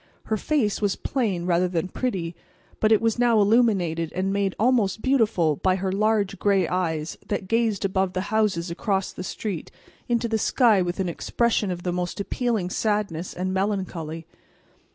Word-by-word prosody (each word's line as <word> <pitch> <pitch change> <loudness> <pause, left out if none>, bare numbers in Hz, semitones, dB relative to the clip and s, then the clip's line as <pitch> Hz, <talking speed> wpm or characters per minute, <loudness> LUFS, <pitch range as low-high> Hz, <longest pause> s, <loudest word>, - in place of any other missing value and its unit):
Her 220 - -1
face 215 -3 0
was 205 -2 +1
plain 205 -10 -1
rather 180 0 +2
than 175 -1 -1
pretty, 180 -8 -3 0.4
but 215 - +3
it 220 - +5
was 225 +1 +1
now 240 -2 +4
illuminated 200 -7 +2
and 190 +1 -1
made 200 -1 0
almost 220 -3 +2
beautiful 210 - +2
by 185 +4 +2
her 190 0 -2
large 205 -1 +1
gray 195 -4 +2
eyes 165 -4 -2
that 190 - -3
gazed 225 -2 +1
above 190 -1 0
the 185 - -1
houses 190 -6 +1
across 195 +2 -1
the - - -6
street 190 -2 -4 0.4
into 235 0 +1
the 220 -1 0
sky 220 -4 +4
with 175 +1 -2
an 190 - 0
expression 220 +4 0
of 175 -1 -4
the 180 - -1
most 180 +1 -3
appealing 210 -3 -1
sadness 205 -6 -1
and 185 +1 -2
melancholy. 185 -5 -2
195 Hz, 170 wpm, -24 LUFS, 180-220 Hz, 0.4 s, it